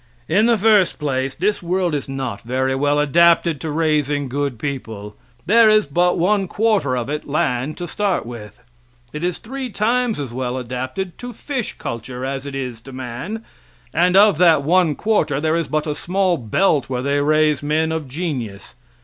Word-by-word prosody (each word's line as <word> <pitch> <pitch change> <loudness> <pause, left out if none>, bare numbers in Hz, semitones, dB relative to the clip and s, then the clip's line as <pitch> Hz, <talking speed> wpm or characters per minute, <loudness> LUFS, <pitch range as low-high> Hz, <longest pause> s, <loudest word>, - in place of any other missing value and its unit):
In 205 +8 +3
the 235 -1 +4
first 210 -3 +3
place, 135 -3 -2
this 205 +5 0
world 180 -1 0
is 145 -2 -3
not 130 -6 -4
very 130 +2 -1
well 145 +2 +1
adapted 165 +1 +3
to 160 - -4
raising 150 -3 0
good 140 -1 -2
people; 110 -6 -6 0.3
there 220 +4 +6
is 215 -3 +4
but 175 +5 +1
one 195 +3 +2
quarter 205 - +1
of 120 -1 -3
it 150 +1 -4
land 145 -2 -1
to 175 - -5
start 200 - -1
with; 115 -4 -10 0.5
it 150 - -5
is 180 -1 -1
three 265 +2 -6
times 235 +1 0
as 135 -5 -5
well 125 0 -3
adapted 130 +9 -5
to 245 0 -7
fish 260 0 -4
culture 125 +2 -5
as 135 +1 -4
it 140 - -6
is 125 -4 -5
to 135 - -12
man, 130 - -6 0.5
and 180 +3 +3
of 205 -5 +5
that 165 -5 +5
one 170 0 +3
quarter 205 -10 +1
there 155 +1 +1
is 165 -3 -1
but 155 +1 -1
a 150 - -1
small 185 +3 0
belt 140 - +1
where 125 -1 -2
they 140 +1 +1
raise 155 0 +2
men 155 +2 0
of 160 -3 -3
genius. 130 - -5
150 Hz, 185 wpm, -20 LUFS, 130-180 Hz, 0.5 s, there